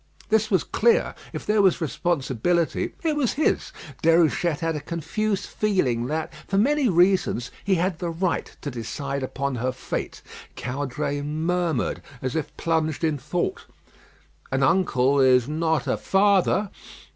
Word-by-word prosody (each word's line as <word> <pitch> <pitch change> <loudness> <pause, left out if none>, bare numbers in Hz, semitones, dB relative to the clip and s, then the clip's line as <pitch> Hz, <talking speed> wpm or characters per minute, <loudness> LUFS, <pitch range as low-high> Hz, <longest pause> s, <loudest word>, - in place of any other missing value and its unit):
This 220 0 +2
was 190 -6 +2
clear; 235 +1 +2 0.2
if - - -6
there 210 0 +3
was 190 -2 +3
responsibility, 165 0 0
it 315 -2 +1
was 280 -6 +1
his. 300 - 0 0.3
Déruchette 165 -1 +3
had 165 -1 0
a - - -2
confused 190 +6 -2
feeling 130 - 0
that, 155 +3 -3
for 195 - 0
many 275 +4 +3
reasons, 175 - +2
he 195 -1 +2
had 175 -1 -1
the 175 - -2
right 170 +2 -2
to 145 - -4
decide 135 +4 -4
upon 135 0 -3
her 125 +2 -1
fate. 130 - -5 0.3
Caudray 140 +2 -3
murmured, 160 0 -1 0.2
as 130 +2 -3
if 160 -3 -3
plunged 160 -1 0
in 155 -3 +1
thought, 175 +6 -3 0.8
"An 135 0 +1
uncle 140 -5 +3
is 130 -2 +5
not 160 -1 0
a - - 0
father." 200 +1 +2
165 Hz, 145 wpm, -24 LUFS, 140-190 Hz, 0.8 s, is